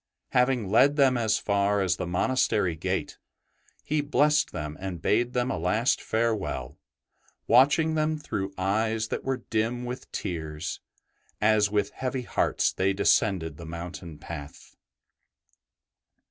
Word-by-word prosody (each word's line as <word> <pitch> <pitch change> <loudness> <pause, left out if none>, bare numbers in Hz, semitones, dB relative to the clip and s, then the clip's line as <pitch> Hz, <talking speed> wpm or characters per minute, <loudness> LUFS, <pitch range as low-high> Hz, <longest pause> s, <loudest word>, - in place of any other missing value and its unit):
Having 125 -5 +1
led 135 +6 +5
them 135 -3 +4
as 110 -3 +1
far 100 0 +1
as 95 -1 +1
the - - -3
monastery 95 -1 +1
gate, - - -3 0.6
he 150 0 0
blessed 150 0 +2
them 75 0 -5
and 95 -3 -5
bade 120 +8 +1
them 125 +1 0
a - - -2
last 110 +9 +1
farewell, 110 - -2 0.7
watching 145 +6 +4
them 155 0 0
through 95 -9 -4
eyes 110 +3 0
that - - -3
were 130 -2 -2
dim 115 +2 0
with 125 +1 -7
tears, 80 -3 -4 0.6
as 105 -1 +3
with 105 0 0
heavy 130 0 -3
hearts - - 0
they 95 +1 +1
descended 90 -6 +1
the 85 - -9
mountain 85 -1 -7
path. 70 0 -9
110 Hz, 130 wpm, -27 LUFS, 90-125 Hz, 0.7 s, led